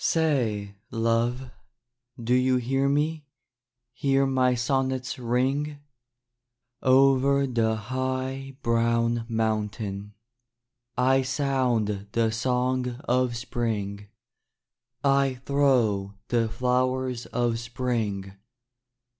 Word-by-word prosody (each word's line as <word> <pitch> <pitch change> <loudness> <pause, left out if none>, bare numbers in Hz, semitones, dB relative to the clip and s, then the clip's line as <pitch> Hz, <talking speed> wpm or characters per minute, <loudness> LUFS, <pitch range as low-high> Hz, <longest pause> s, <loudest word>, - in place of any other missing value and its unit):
Say, 120 -11 +1 0.2
love, 120 +2 0 0.7
do 120 +1 0
you 130 0 +3
hear 135 +3 +1
me. 150 +1 0 0.7
Hear 135 +2 +2
my 130 -2 +2
sonnets 130 +1 -1
ring? 135 +5 0 1.0
Over 135 +1 +4
the 115 -4 +1
high, 130 +3 -3
brown 115 0 +1
mountain 105 -2 -2 0.8
I 130 +2 +4
sound 125 -7 0
the 115 -1 +2
song 125 +1 -1
of 125 -1 +1
spring, 105 -4 -3 1.0
I 135 -1 +3
throw 120 -9 +2
the 115 -2 +1
flowers 125 +1 0
of 120 -2 0
spring. 115 -5 -3
125 Hz, 85 wpm, -26 LUFS, 115-130 Hz, 1.0 s, Over